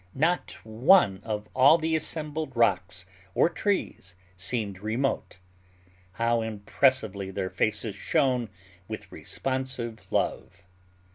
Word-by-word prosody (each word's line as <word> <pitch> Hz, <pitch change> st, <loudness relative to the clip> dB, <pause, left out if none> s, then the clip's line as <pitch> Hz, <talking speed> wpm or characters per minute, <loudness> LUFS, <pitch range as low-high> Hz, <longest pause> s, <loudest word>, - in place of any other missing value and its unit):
Not 165 Hz, +6 st, +1 dB
one 110 Hz, -, +4 dB
of 105 Hz, -1 st, -4 dB
all 135 Hz, +5 st, +7 dB
the 160 Hz, 0 st, 0 dB
assembled 155 Hz, -3 st, -3 dB
rocks 90 Hz, -5 st, +1 dB, 0.3 s
or -, -, +4 dB
trees 170 Hz, -, -2 dB, 0.2 s
seemed 100 Hz, +1 st, -2 dB
remote. 110 Hz, +2 st, -2 dB, 0.8 s
How 115 Hz, +2 st, +1 dB
impressively 110 Hz, -1 st, 0 dB
their 95 Hz, -1 st, -3 dB
faces 110 Hz, 0 st, 0 dB
shone 125 Hz, -1 st, +1 dB, 0.4 s
with -, -, -7 dB
responsive 130 Hz, -4 st, -4 dB
love! -, -, -2 dB
115 Hz, 100 wpm, -27 LUFS, 100-135 Hz, 0.8 s, all